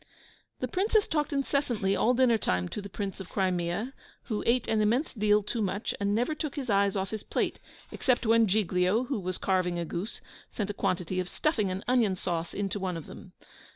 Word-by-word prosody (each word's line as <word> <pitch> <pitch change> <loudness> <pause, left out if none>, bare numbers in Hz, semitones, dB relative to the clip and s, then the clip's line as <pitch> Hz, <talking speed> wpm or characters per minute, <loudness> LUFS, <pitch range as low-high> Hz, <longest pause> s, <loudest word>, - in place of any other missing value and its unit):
] - - -34
The - - 0
Princess 415 +3 +2
talked 300 -1 0
incessantly 270 -8 0
all 245 +5 +3
dinner 240 -3 +4
time 90 - 0
to 210 - -4
the 200 - -8
Prince 195 0 -4
of 190 - -8
Crimea 185 +5 -1 0.3
who 215 -4 -2
ate 240 +1 +3
an 220 -1 +2
immense 235 +8 +1
deal 210 -2 +3
too 225 +3 -2
much, 200 +1 -1
and 200 0 +1
never 245 +7 +1
took 305 -2 -4
his 270 -6 -2
eyes 200 0 +3
off 195 0 -2
his 220 -1 -3
plate, - - -1 0.3
except 255 -2 +1
when 225 0 +5
Giglio, 190 +2 +2
who 255 -2 -2
was 185 -1 -3
carving 185 -2 +1
a 170 - -2
goose, 185 +7 -4 0.3
sent 205 -2 -3
a - - -7
quantity 185 -2 -1
of 180 -1 -2
stuffing 225 - 0
and 185 +2 -3
onion 235 -6 +3
sauce 170 -2 -3
into 205 0 -2
one 185 -3 -2
of 165 - -7
them. - - -12
205 Hz, 210 wpm, -29 LUFS, 185-240 Hz, 0.3 s, when